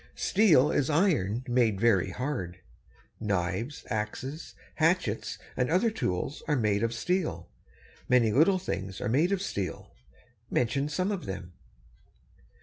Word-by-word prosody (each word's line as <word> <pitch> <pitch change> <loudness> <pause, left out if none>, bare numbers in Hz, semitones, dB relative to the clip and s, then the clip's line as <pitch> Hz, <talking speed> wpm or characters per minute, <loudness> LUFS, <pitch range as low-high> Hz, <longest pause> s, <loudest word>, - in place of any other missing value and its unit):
Steel 165 -10 +4
is 140 - +1
iron 145 - +2
made 120 -5 +2
very 110 -5 +3
hard. 125 -10 -4 0.6
Knives, 100 - -2
axes, 120 +8 -4 0.2
hatchets, - - +1 0.2
and 125 - 0
other 185 +8 +3
tools 130 - -2
are 150 - +2
made 105 -5 +1
of 115 0 +1
steel. 115 - -2 0.6
Many 120 -3 +4
little 165 - +4
things 95 - -4
are - - -2
made 155 - +2
of 200 -1 0
steel. 95 - -4 0.6
Mention 135 +5 0
some 185 +7 -1
of 195 -4 -4
them. 95 -2 -6
125 Hz, 130 wpm, -28 LUFS, 100-155 Hz, 0.6 s, Steel